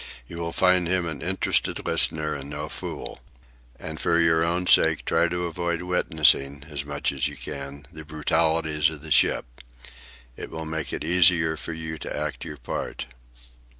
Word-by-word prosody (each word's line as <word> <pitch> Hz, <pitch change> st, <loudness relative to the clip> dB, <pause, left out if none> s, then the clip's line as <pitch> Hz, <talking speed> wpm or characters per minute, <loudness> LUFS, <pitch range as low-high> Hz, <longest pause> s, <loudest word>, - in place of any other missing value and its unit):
You 85 Hz, -, -8 dB
will 85 Hz, 0 st, -3 dB
find 90 Hz, 0 st, +3 dB
him 90 Hz, 0 st, +1 dB
an 80 Hz, -4 st, -5 dB
interested 95 Hz, +2 st, 0 dB
listener 75 Hz, -1 st, +4 dB
and 70 Hz, 0 st, -7 dB
no 75 Hz, +1 st, -5 dB
fool. -, -, -7 dB, 0.6 s
And 80 Hz, +3 st, -7 dB
for 85 Hz, -1 st, +2 dB
your 80 Hz, -1 st, +3 dB
own 85 Hz, +2 st, 0 dB
sake 80 Hz, -3 st, +4 dB
try 85 Hz, +1 st, +2 dB
to 90 Hz, +1 st, -3 dB
avoid 85 Hz, 0 st, -2 dB
witnessing, 75 Hz, -5 st, +2 dB
as 75 Hz, -3 st, -4 dB
much 70 Hz, 0 st, -2 dB
as -, -, -1 dB
you -, -, -8 dB
can, 70 Hz, +1 st, -7 dB
the 80 Hz, 0 st, -9 dB
brutalities 80 Hz, 0 st, +1 dB
of 75 Hz, -2 st, -10 dB
the 80 Hz, -, -10 dB
ship. -, -, +3 dB, 0.9 s
It -, -, -8 dB
will 80 Hz, 0 st, -6 dB
make 80 Hz, -1 st, -4 dB
it -, -, -4 dB
easier 80 Hz, -1 st, +4 dB
for 80 Hz, -, -6 dB
you 80 Hz, -1 st, -6 dB
to -, -, -5 dB
act 75 Hz, +2 st, -4 dB
your 75 Hz, -3 st, -7 dB
part." -, -, -5 dB
80 Hz, 175 wpm, -25 LUFS, 75-85 Hz, 0.9 s, listener